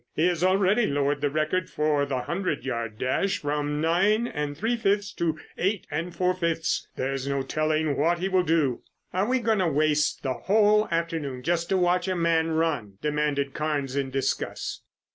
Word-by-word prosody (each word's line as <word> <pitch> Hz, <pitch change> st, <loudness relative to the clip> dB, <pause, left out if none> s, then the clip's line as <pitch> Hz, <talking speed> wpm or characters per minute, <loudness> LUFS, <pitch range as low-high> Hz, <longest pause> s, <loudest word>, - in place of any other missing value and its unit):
He 160 Hz, -, +2 dB
has 175 Hz, -1 st, -1 dB
already 195 Hz, +4 st, +3 dB
lowered 145 Hz, 0 st, 0 dB
the 145 Hz, -, +1 dB
record 155 Hz, +5 st, -1 dB
for 150 Hz, -2 st, +1 dB
the 130 Hz, -2 st, -1 dB
hundred 170 Hz, 0 st, -2 dB
yard 115 Hz, -4 st, -3 dB
dash 130 Hz, -, 0 dB
from 145 Hz, 0 st, -2 dB
nine 195 Hz, +8 st, +2 dB
and 150 Hz, -8 st, -4 dB
three 225 Hz, +7 st, 0 dB
fifths 205 Hz, -2 st, 0 dB
to 165 Hz, -2 st, -1 dB, 0.2 s
eight 195 Hz, 0 st, 0 dB
and 165 Hz, +4 st, -2 dB
four 180 Hz, +1 st, +2 dB
fifths. 170 Hz, -3 st, -1 dB
There 135 Hz, +1 st, -2 dB
is 135 Hz, 0 st, -4 dB
no 140 Hz, -1 st, 0 dB
telling 155 Hz, +1 st, 0 dB
what 165 Hz, +5 st, +2 dB
he 185 Hz, +2 st, -1 dB
will 190 Hz, -1 st, +3 dB
do." 155 Hz, -8 st, +1 dB, 0.3 s
"Are 190 Hz, +3 st, +1 dB
we 260 Hz, +1 st, +2 dB
going 225 Hz, -3 st, +1 dB
to 185 Hz, -, +2 dB
waste 150 Hz, 0 st, +1 dB
the 130 Hz, -2 st, 0 dB
whole 210 Hz, -, +3 dB
afternoon 165 Hz, -6 st, -2 dB
just 170 Hz, +2 st, 0 dB
to 190 Hz, -, +2 dB
watch 180 Hz, 0 st, +2 dB
a 185 Hz, -, 0 dB
man 165 Hz, -1 st, +2 dB
run?" 155 Hz, -12 st, -1 dB
demanded 150 Hz, -2 st, 0 dB
Carnes 145 Hz, -3 st, -2 dB
in 140 Hz, -1 st, -1 dB
disgust. 135 Hz, 0 st, -2 dB
160 Hz, 185 wpm, -26 LUFS, 145-185 Hz, 0.3 s, already